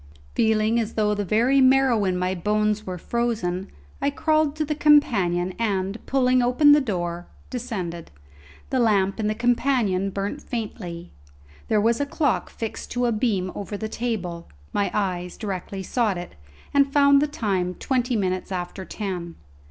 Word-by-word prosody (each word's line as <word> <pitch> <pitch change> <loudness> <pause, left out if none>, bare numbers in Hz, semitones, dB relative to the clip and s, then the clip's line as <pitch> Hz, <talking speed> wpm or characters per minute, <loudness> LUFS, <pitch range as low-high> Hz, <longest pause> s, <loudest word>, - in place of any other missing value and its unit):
Feeling 220 +1 +2
as 225 -1 -3
though 210 -1 +2
the 205 0 -1
very 235 +7 +3
marrow 260 -5 +4
in 185 -1 0
my 180 +1 0
bones 210 +3 0
were 180 -1 -4
frozen, 205 -4 -2 0.3
I 280 - +2
crawled 310 0 +1
to 310 0 -1
the 300 - -1
companion 195 - +3
and, 200 -1 -1
pulling 255 -1 +3
open 250 +5 +5
the 295 0 +6
door, 175 -7 -3 0.2
descended. 190 -10 -4 0.6
The 260 - +1
lamp 200 -3 +2
in 215 - 0
the 215 - 0
companion 235 -5 +1
burnt 200 +9 -4
faintly. 185 -9 -6 0.6
There 215 - +2
was 230 +5 +2
a 285 - -1
clock 285 -2 0
fixed 225 -1 -6
to 245 0 0
a 240 - +2
beam 210 -5 0
over 205 +1 -5
the 220 - -4
table; 195 -8 -4 0.2
my 205 - +1
eyes 180 -3 -2
directly 195 -1 -5
sought 215 -2 0
it, 175 - -7 0.4
and 280 -1 +4
found 280 0 +5
the 300 - +2
time 195 - -1
twenty 250 -2 0
minutes 185 -2 -1
after 180 +1 -4
ten. 180 -6 -5
215 Hz, 160 wpm, -24 LUFS, 185-250 Hz, 0.6 s, the